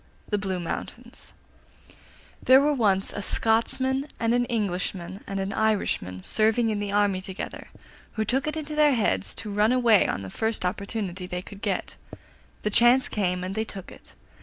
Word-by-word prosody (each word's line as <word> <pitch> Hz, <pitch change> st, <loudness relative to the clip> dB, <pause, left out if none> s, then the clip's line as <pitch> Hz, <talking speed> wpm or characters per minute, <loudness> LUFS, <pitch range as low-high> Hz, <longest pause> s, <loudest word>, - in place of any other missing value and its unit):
THE 210 Hz, -, 0 dB
BLUE 190 Hz, -2 st, -2 dB
MOUNTAINS 170 Hz, -, -7 dB, 1.1 s
There 260 Hz, +1 st, +7 dB
were 295 Hz, +2 st, +2 dB
once 200 Hz, -7 st, +1 dB
a 205 Hz, -, -4 dB
Scotsman 260 Hz, +6 st, +1 dB
and 230 Hz, 0 st, +1 dB
an 245 Hz, 0 st, +2 dB
Englishman 190 Hz, -4 st, -3 dB
and 195 Hz, 0 st, -3 dB
an 195 Hz, +1 st, -2 dB
Irishman 195 Hz, -, -1 dB
serving 225 Hz, +1 st, +2 dB
in 210 Hz, -, -1 dB
the 205 Hz, -1 st, -3 dB
army 200 Hz, -2 st, +2 dB
together, 190 Hz, 0 st, -4 dB, 0.5 s
who 220 Hz, -1 st, -1 dB
took 260 Hz, +6 st, 0 dB
it 305 Hz, +1 st, -2 dB
into 305 Hz, -1 st, -5 dB
their 300 Hz, -2 st, +4 dB
heads 95 Hz, -, +1 dB
to 210 Hz, -2 st, -5 dB
run 210 Hz, +3 st, +3 dB
away 240 Hz, -5 st, +4 dB
on 100 Hz, -, -3 dB
the 95 Hz, -, -8 dB
first 220 Hz, -, -2 dB
opportunity 190 Hz, -1 st, -3 dB
they 180 Hz, 0 st, -4 dB
could 200 Hz, 0 st, -12 dB
get. -, -, -2 dB, 0.7 s
The 210 Hz, -, 0 dB
chance 240 Hz, +4 st, +5 dB
came 180 Hz, -3 st, -1 dB
and 185 Hz, +1 st, -4 dB
they 220 Hz, +2 st, -1 dB
took 195 Hz, -4 st, -8 dB
it. -, -, -14 dB
210 Hz, 175 wpm, -26 LUFS, 190-235 Hz, 1.1 s, There